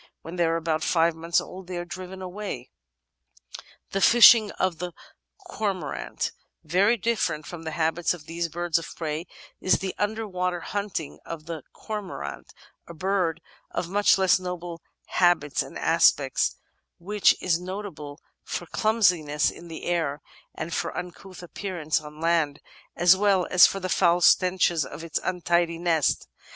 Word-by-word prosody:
When 165 +2 -8
they 175 -1 +2
are 165 - +1
about 160 -1 -1
five 165 -1 +3
months 165 +1 0
old 185 -1 -9
they 180 -1 -5
are 175 - -4
driven 185 +1 -8
away. 185 -9 -6 1.2
The 195 - -1
Fishing 230 -1 +8
of 185 -3 -1
the 180 0 -5 0.4
Cormorant 200 - -3 0.3
Very 195 +9 +3
different 180 -8 -1
from 175 -2 -8
the - - -2
habits 165 +1 +1
of 155 -4 -14
these 170 +1 -3
birds 170 +1 0
of 165 - -9
prey 160 +1 -4 0.3
is 185 - +3
the 190 -1 -4
under 215 +2 -1
water 180 -2 -2
hunting 200 -7 -4
of 160 -2 -8
the 165 -2 -6
Cormorant, 190 - -6 0.4
a 170 - -10
bird 180 -2 0 0.3
of 170 - -4
much 205 +2 +4
less 190 0 +4
noble 175 -2 -6 0.2
habits 175 -5 +2
and - - -7
aspect, - - +3 0.4
which 205 +3 +2
is 170 -2 +1
notable 180 -6 -7 0.2
for - - -4
clumsiness 180 -10 +2
in 170 - -12
the 165 -1 -8
air, 160 -5 -1 0.4
and 165 - -5
for - - -2
uncouth 180 +1 -8
appearance 175 -4 -2
on 150 0 -11
land, 165 -3 +1 0.4
as 175 +2 +6
well 195 -2 +2
as 185 - +8
for 195 - -4
the 185 - -3
foul 175 -1 +3
stenches 180 -3 +4
of 160 - -8
its 165 -2 -2
untidy 175 -2 0
nest! 165 -3 +1
175 Hz, 155 wpm, -26 LUFS, 165-190 Hz, 1.2 s, Fishing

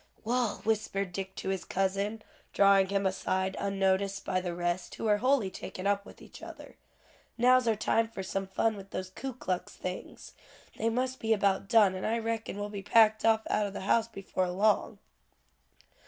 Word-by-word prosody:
"Wal," 240 -1 0
whispered 200 -4 -1
Dick 190 0 -5
to - - -4
his 190 -2 -2
cousin, 200 +3 -1 0.3
drawing 195 -1 +5
him 200 0 0
aside 190 0 -1
unnoticed 195 0 0
by 185 -1 0
the 175 -2 -4
rest, 175 +1 -2
who - - -7
were 210 -2 +3
wholly 255 -5 +2
taken 185 - -7
up 200 0 +1
with - - -14
each - - -13
other, - - -11 0.6
"now's 250 +1 +4
our 225 - +3
time 225 +2 +1
for 205 -4 -7
some 195 0 -3
fun 220 +3 0
with 195 -1 -10
those 185 -1 -5
Ku 265 +7 -5
Klux 185 -7 -4
things. 180 0 -7 0.4
They 225 - 0
must 255 +2 -1
be 225 0 +2
about 195 -2 +1
done, 215 -5 +5
and 185 - -3
I 225 +2 +1
reckon 225 -2 -3
will 205 0 -4
be 205 -1 -6
packed 220 +1 +4
off 220 -1 +3
out 210 -1 +1
o' - - -5
the 195 - -7
house 220 +4 +2
before 190 -4 -3
long." 205 +4 +1
200 Hz, 185 wpm, -30 LUFS, 190-225 Hz, 0.6 s, drawing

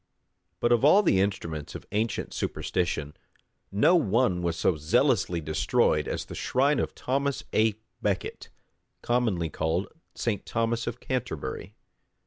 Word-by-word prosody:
But 120 - +1
of 120 0 +4
all 190 +9 +7
the 95 - +3
instruments 85 -7 -2
of - - -8
ancient 110 +2 -1
superstition, 75 -5 -2 0.6
no 145 - +4
one 115 - +2
was 85 -1 -1
so 90 - +2
zealously 80 +2 +2
destroyed 80 0 +1
as - - -3
the - - -9
shrine 140 +3 +1
of - - -2
Thomas 140 +1 -1
à 110 -1 +3 0.3
Becket, - - -2 0.5
commonly 110 -10 0
called 80 +6 -1 0.3
St. 110 -5 -2
Thomas 115 0 -1
of 120 +1 -4
Canterbury. 95 - -4
105 Hz, 130 wpm, -27 LUFS, 85-125 Hz, 0.6 s, all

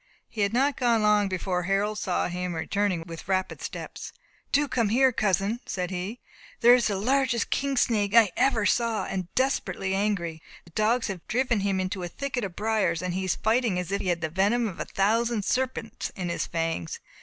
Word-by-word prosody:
He 215 - -5
had 200 0 +2
not 270 +4 +2
gone 235 -3 +2
long, 210 -1 +4
before 185 -1 -1
Harold 195 +4 0
saw 180 - 0
him 180 0 -3
returning 185 +1 -1
with 165 -1 -9
rapid 190 -1 -1
steps. - - -6 0.4
"Do 290 +1 +3
come 230 -6 +1
here, 260 +4 +4
cousin," 205 +1 0
said 180 -1 -3
he, 190 +6 -4 0.4
"there 240 0 +8
is 245 -2 +4
the 205 - -1
largest 250 +2 +1
king 275 -1 0
snake 210 -4 +2
I 225 -5 +7
ever 230 -6 +2
saw, 230 +1 +1
and 185 -2 -4
desperately 260 -7 0
angry. 195 -5 -1 0.2
The 170 - -17
dogs 220 +6 +1
have 190 -4 -6
driven 240 0 +1
him 195 -1 0
into 185 +1 -2
a 175 - -3
thicket 260 +6 -4
of 185 -3 -5
briers, 210 -6 0
and 180 -1 -2
he 190 +1 -2
is 185 - +1
fighting 225 -3 +1
as 180 0 -3
if 200 - 0
he - - -4
had 175 -2 0
the 160 - -1
venom 205 +7 +2
of 190 - -7
a - - -2
thousand 220 +2 +1
serpents 255 -4 -2
in 180 -2 -3
his 170 - -2
fangs. 165 - -2
205 Hz, 200 wpm, -27 LUFS, 185-235 Hz, 0.4 s, there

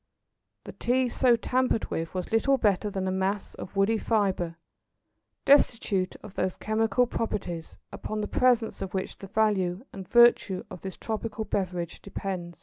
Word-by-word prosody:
The - - -8
Tea 250 +1 +1
so 245 0 +4
tampered 250 0 0
with 165 +2 -3
was 185 - -3
little 270 +5 +3
better 210 -3 +1
than 190 -1 -3
a - - 0
mass 190 +2 -1
of 190 - -9
woody 205 +3 +2
fibre, 190 -7 0 0.9
destitute 225 -9 +3
of 210 -3 -10
those 185 -2 -1
chemical 220 +2 +1
properties 180 -8 -4
upon 215 0 -4
the 210 - -2
presence 245 -3 +2
of 195 -1 -4
which 190 - -3
the 195 - -8
value 200 -1 +1
and 190 -2 -8
virtue 235 -5 +5
of 180 - -8
this 190 -1 -7
tropical 220 0 -4
beverage 180 -4 -3
depend. 185 -3 -5
205 Hz, 155 wpm, -27 LUFS, 185-225 Hz, 0.9 s, virtue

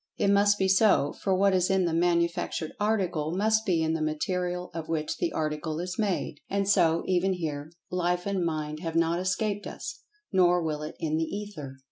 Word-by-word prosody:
It 200 - +2
must 205 +1 +4
be 190 - +1
so, 190 -7 +4
for 190 -2 0
what 195 +1 +3
is 185 +1 +2
in 190 -1 +2
the 170 - 0
manufactured 170 -1 0
article 185 -6 0
must 220 +2 +2
be 170 -4 +2
in 160 0 +1
the 160 - -2
material 180 +3 -2
of 165 -1 -6
which 155 -2 -2
the 345 -2 -1
article 155 0 -2
is 180 +3 -4
made. 195 -8 -1
And 200 0 0
so, 170 -5 +3
even 185 +1 +2
here, 155 -3 -4 0.2
Life 180 0 0
and 195 -3 0
Mind 155 -2 -2
have 165 -1 -4
not 165 +1 +2
escaped 205 +2 -1
us. 350 - -7 0.3
Nor 180 -3 +4
will 155 -2 -2
it 150 +1 -6
in 155 -1 -1
The 160 - +1
Ether! 170 -9 -7
175 Hz, 195 wpm, -28 LUFS, 160-195 Hz, 0.3 s, must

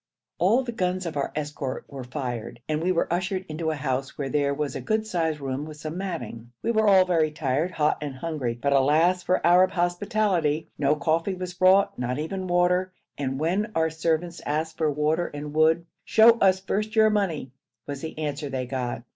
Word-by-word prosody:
All 220 +9 +3
the 245 - -4
guns 185 -4 -1
of 165 - -4
our 140 - -1
escort 145 -3 -4
were 135 -2 -8
fired, 125 -3 -5
and 155 0 -1
we 180 +2 +1
were 170 - +1
ushered 185 +1 -1
into 160 +1 -3
a 160 - -1
house, 135 -2 -3
where 140 -2 -3
there 140 0 +1
was 145 +1 -3
a 135 - -4
good 215 - 0
sized 165 -7 -1
room 135 0 -3
with 155 0 -9
some 155 +1 -6
matting. 165 -11 -5
We 230 - +1
were 220 -1 +2
all 190 -2 +6
very 165 -4 +2
tired, 150 +2 -1
hot 150 -4 0
and 145 -3 -4
hungry, 130 -5 -3
but 140 +2 +1
alas 155 +7 +3
for 180 0 0
Arab 180 +2 +6
hospitality! 175 -3 0
No 145 +1 +2
coffee 165 +5 0
was 180 -1 -5
brought, 185 -1 +4
not 125 +1 -2
even 185 +5 -4
water, 180 +1 +2 0.2
and 135 -1 -3
when 190 +8 0
our 160 0 +2
servants 165 +2 -1
asked 155 +2 -2
for 155 -2 +2
water 150 +4 0
and 145 0 -7
wood 160 +2 +3 0.2
'Show 225 +1 +7
us 190 -1 +4
first 210 +3 -2
your 220 -1 +5
money' 175 - -1 0.3
was 140 -1 -6
the 160 - -6
answer 145 -1 -3
they 130 -1 -3
got. 125 -2 -3
160 Hz, 200 wpm, -25 LUFS, 145-185 Hz, 0.3 s, Show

